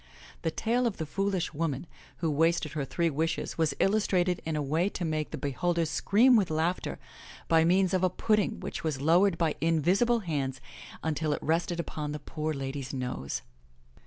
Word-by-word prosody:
The - - 0
tale 235 +8 +1
of 220 - -3
the 160 - -3
foolish 195 +1 -1
woman 150 -1 -2 0.3
who 165 -2 0
wasted 165 +1 +2
her 150 -3 -2
three 165 +4 0
wishes 160 +3 -2
was 160 -2 +2
illustrated 185 -3 +2
in 160 - -1
a 150 - 0
way 160 +7 +1
to 180 - -4
make 155 -1 -1
the - - -5
be 145 - -2
holders 170 +3 0
scream 240 +6 +4
with 200 -5 +3
laughter, 160 +3 -1 0.5
by 165 -1 +5
means 185 +2 +3
of 185 0 +2
a 185 - +4
pudding 210 +2 +1
which - - -5
was 155 -4 -1
lowered 170 +5 +4
by 165 -2 +1
invisible 180 +9 +3
hands 140 -7 -2 0.4
imtil 155 -1 0
it - - -9
rested 170 +2 0
upon 150 -3 -4
the 150 - -4
poor 155 +2 -3
lady's 135 -2 -4
nose. 125 - -3
165 Hz, 185 wpm, -29 LUFS, 150-185 Hz, 0.5 s, by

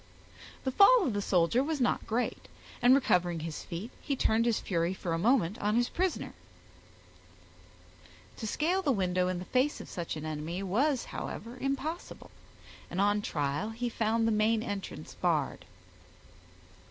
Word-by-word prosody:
The 260 - 0
fall 400 - +6
of 245 - 0
the 205 - -1
soldier 190 +6 +2
was 310 0 -2
not 245 - 0
great, 235 +3 -2 0.3
and 245 +2 +7
recovering 175 - +2
his 160 -1 -5
feet, 190 +8 -6
he 280 - -1
turned 230 -2 +2
his 230 - +2
fury 170 0 -1
for 175 -3 -3
a 165 - 0
moment 215 -2 +2
on 210 +1 +1
his 240 +1 +2
prisoner. 370 0 -1 2.0
To 220 - -4
scale 345 - +1
the 300 -7 +1
window 180 -4 +1
in 185 -1 -1
the 180 - -6
face 260 +7 +1
of - - -9
such 170 -2 -4
an 155 0 -6
enemy, 155 +4 -4
was, 250 +8 +1
however, 235 +2 -6
impossible, 275 +6 -4 0.6
and 175 - -4
on 205 +1 +3
trial 145 +3 -2
he 240 +2 -3
found 225 0 +1
the - - +2
main 215 +1 +2
entrance 195 -8 -6
barred. 150 - -1
215 Hz, 160 wpm, -30 LUFS, 175-255 Hz, 2.0 s, and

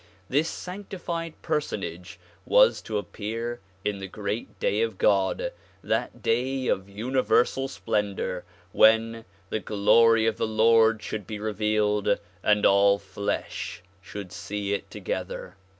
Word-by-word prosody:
This 150 +5 +2
sanctified 180 -3 -6
personage 105 - -3 0.2
was - - +5
to 110 - -3
appear 115 +3 -4 0.3
in 105 -1 -1
the 95 - -5
great 105 +3 -5
Day 105 - +1
of 115 -4 -1
God, 100 - +2 0.3
that - - -2
Day 130 +3 0
of 95 -4 0
universal 130 +4 +1
splendor 100 -7 -2 0.3
when 115 +1 +4
' 95 - -31
' 95 - -34
the 110 - 0
glory 110 +2 +4
of 110 -1 +1
the - - 0
Lord 110 0 +4
should 105 -3 -5
be 110 - -4
revealed 105 -1 +1 0.2
and 105 +1 +3
all 100 0 +5
flesh 100 0 -4 0.2
should 100 0 -8
see 100 -1 -3
it 100 -1 -3
together. 95 -1 -5
110 Hz, 135 wpm, -26 LUFS, 100-115 Hz, 0.3 s, was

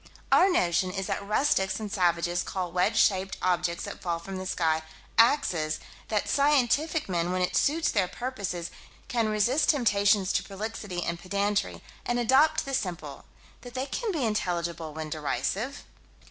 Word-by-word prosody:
Our 385 - +6
notion 185 - +2
is 190 +1 -3
that - - -3
rustics 200 -3 +1
and 210 -2 -5
savages 175 -2 +1
call 180 -2 -4
wedge 185 +5 +1
shaped 195 -2 +2
objects 175 -1 0
that - - -7
fall 170 -2 -1
from 190 +3 -7
the 185 0 -5
sky, 160 -3 +1 0.4
"axes": 175 - +3 0.3
that 210 -2 -1
scientific 290 +2 +2
men, 175 -2 -1
when 185 0 0
it 180 - -1
suits 315 +3 +2
their 195 -4 +1
purposes, 195 -6 -4 0.4
can 230 -3 0
resist 225 +8 +2
temptations 205 - +3
to - - +1
prolixity 200 -3 -5
and 170 0 -3
pedantry, 200 +2 -1 0.2
and 240 - -1
adopt 270 +6 +3
the 275 - -5
simple: 170 - -4 0.4
that 245 +1 -11
they 260 +1 -1
can 435 - -3
be 305 -9 -1
intelligible 170 -6 -2
when 155 0 -6
derisive. 200 - -2
195 Hz, 160 wpm, -27 LUFS, 175-245 Hz, 0.4 s, Our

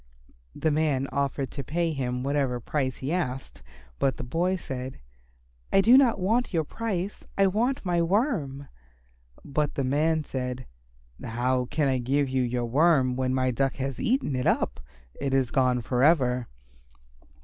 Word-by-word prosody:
The 160 - 0
man 145 -3 +1
offered 140 -2 -1
to 140 - -5
pay 165 +4 -1
him 125 -3 -2
whatever 135 -3 0
price 130 +1 -2
he 135 +5 -3
asked, 135 - -3 0.4
but 135 - +1
the - - -5
boy 170 +9 0
said, 130 - -6 0.7
"I 195 - +5
do 235 +5 +6
not 260 -4 +5
want 225 +7 +1
your 165 -4 +1
price. 200 +1 -4
I 195 - +5
want 225 +6 0
my 175 -1 +1
Worm." 165 - 0 0.8
But 145 +1 -1
the 140 - 0
man 155 +4 +1
said, 130 -2 -4 0.6
"How 125 +2 0
can 145 +3 0
I 130 -1 +1
give 135 +3 +1
you 130 0 +1
your 120 -1 -1
Worm 135 0 +3
when 130 0 0
my 130 -1 +1
Duck 135 +2 0
has 135 -2 -4
eaten 235 - 0
it 125 - -1
up? - - +1 0.4
It 135 -1 0
is 130 -3 +1
gone 125 -3 +2
for 125 +1 -1
ever." 125 -6 +3
140 Hz, 160 wpm, -27 LUFS, 130-165 Hz, 0.8 s, do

